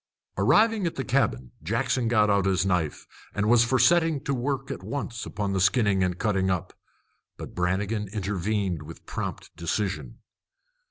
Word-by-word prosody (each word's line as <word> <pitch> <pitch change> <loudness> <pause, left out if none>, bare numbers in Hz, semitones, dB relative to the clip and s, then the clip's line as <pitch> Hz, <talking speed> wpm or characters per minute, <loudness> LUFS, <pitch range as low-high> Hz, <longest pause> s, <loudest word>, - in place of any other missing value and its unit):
Arriving 220 -3 +3
at 165 - -4
the 135 - -2
cabin, 65 - 0
Jackson 125 -3 0
got 110 -2 +4
out 100 -2 +2
his 95 0 +2
knife, 90 -6 -1 0.3
and 100 +1 0
was 120 +1 +6
for 115 +3 +1
setting 160 +3 +4
to 140 0 -2
work 135 +1 -2
at - - -5
once 125 -5 -5
on 100 -2 -1
the 95 - 0
skinning 100 -1 +3
and 90 -1 -1
cutting 95 -3 +1
up. 90 -3 -2 0.6
But - - -8
Brannigan 100 +4 -1
intervened 100 -3 -2
with 80 +2 -11
prompt - - -5
decision. 95 +4 -3
105 Hz, 160 wpm, -26 LUFS, 95-125 Hz, 0.6 s, was